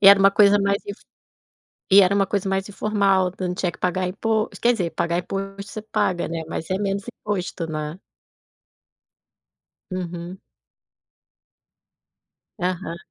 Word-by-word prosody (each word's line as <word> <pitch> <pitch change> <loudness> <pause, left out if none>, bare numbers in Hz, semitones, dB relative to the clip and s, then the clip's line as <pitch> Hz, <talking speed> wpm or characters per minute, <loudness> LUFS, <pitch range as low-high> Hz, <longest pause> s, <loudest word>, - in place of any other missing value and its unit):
e 195 - +9
era 200 0 +9
uma 195 0 +6
coisa 205 0 +5
mais 200 0 0
inf 205 +1 -6 0.9
e 200 +1 +9
era 190 +1 +4
uma 200 -1 +3
coisa 195 0 -1
mais 195 0 -1
informal, 195 -3 +2
então 185 0 -4
não 180 - -2
tinha 180 -2 -1
que - - -15
pagar 180 0 0
impos 215 +3 -1
quer 240 - +4
dizer, 180 -7 -2 0.3
imposto 195 +1 -5
você 215 - -5
paga, 205 -4 0
né, 165 0 -4
mas 160 - -5
é 190 - +2
menos 200 0 -1
imposto, 185 -6 -3
né. 155 +3 -4 1.9
Uhum. 175 0 -5 2.2
Aham. 180 -2 -2
195 Hz, 140 wpm, -23 LUFS, 180-200 Hz, 2.2 s, e